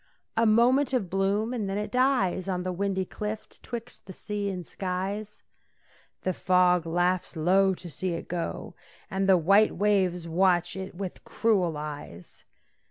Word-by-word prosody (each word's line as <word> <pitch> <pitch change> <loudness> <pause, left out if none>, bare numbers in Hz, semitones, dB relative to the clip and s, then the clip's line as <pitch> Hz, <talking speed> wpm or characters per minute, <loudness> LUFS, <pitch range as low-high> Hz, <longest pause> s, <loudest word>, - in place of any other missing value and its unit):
A 230 0 +3
moment 250 +5 +4
of 200 -9 0
bloom, 200 +5 +1
and 215 -5 -2
then 195 - -2
it 210 0 -3
dies 250 -8 +2
On 180 -1 -1
the 185 - -2
windy 190 0 -1
cliff 215 +3 -5
'twixt 235 -3 -8
the 190 - -8
sea 205 +1 -3
and 180 -3 -5
skies. 195 +4 -4 0.8
The 185 - 0
fog 180 -1 +3
laughs 175 +2 0
low 190 +4 +3
to 180 - -10
see 175 +3 -3
it - - -7
go, 175 -1 -4 0.4
And 195 0 0
the 190 - +7
white 195 +6 +4
waves 185 -3 +1
watch 175 0 +2
it 190 -1 -6
with 190 -1 -6
cruel 185 -8 +1
eyes. 145 - -8
190 Hz, 160 wpm, -27 LUFS, 180-210 Hz, 0.8 s, the